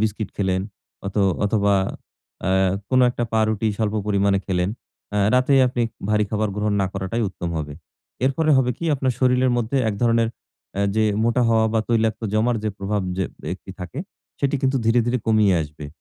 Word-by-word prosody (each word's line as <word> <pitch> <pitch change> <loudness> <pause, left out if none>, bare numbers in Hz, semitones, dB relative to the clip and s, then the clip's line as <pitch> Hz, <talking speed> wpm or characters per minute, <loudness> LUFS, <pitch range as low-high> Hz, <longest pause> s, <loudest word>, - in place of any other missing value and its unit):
Biscuit 110 0 -1
খেলেন, 95 -2 0 0.5
অথ 100 - -5 0.3
অথবা 100 -1 +2 0.7
আ - - +2 0.4
কোনো 130 0 +4
একটা 120 -1 -2
পাউরুটি 110 -1 +1
স্বল্প 110 -1 -1
পরিমাণে 100 -1 +2
খেলেন। 90 -1 0 0.5
আ - - +2 0.2
রাতে 130 +2 +3
আপনি 120 -1 -1 0.3
ভারী 105 0 +3
খাবার 110 -1 0
গ্রহণ 105 0 0
না 95 - +2
করাটাই 95 +4 -2
উত্তম 85 -2 -5
হবে। 75 -1 -5 0.5
এরপরে 155 +4 +2
হবে 125 -1 +3
কি? 170 - -5
আপনার 130 -2 0
শরীরের 125 0 +3
মধ্যে 120 +3 -1
এক 105 - -1
ধরনের 115 -1 +3 0.5
অ্যা 100 +1 0
যে 110 - +3 0.2
মোটা 120 +1 +2
হওয়া 110 -1 +3
বা 110 - +2
তৈলাক্ত 115 -1 +1
জমার 115 +2 +2
যে 110 - +1
প্রভাব 100 +1 -1
যে 95 - 0 0.3
একটি - - -9
থাকে, 90 +10 -6 0.4
সেটি 140 0 +1
কিন্তু 135 0 +2
ধীরে, 115 +2 +4
ধীরে 125 +1 +1
কমিয়ে 110 -3 +4
আসবে। 75 0 -9
110 Hz, 175 wpm, -22 LUFS, 100-120 Hz, 0.7 s, কোনো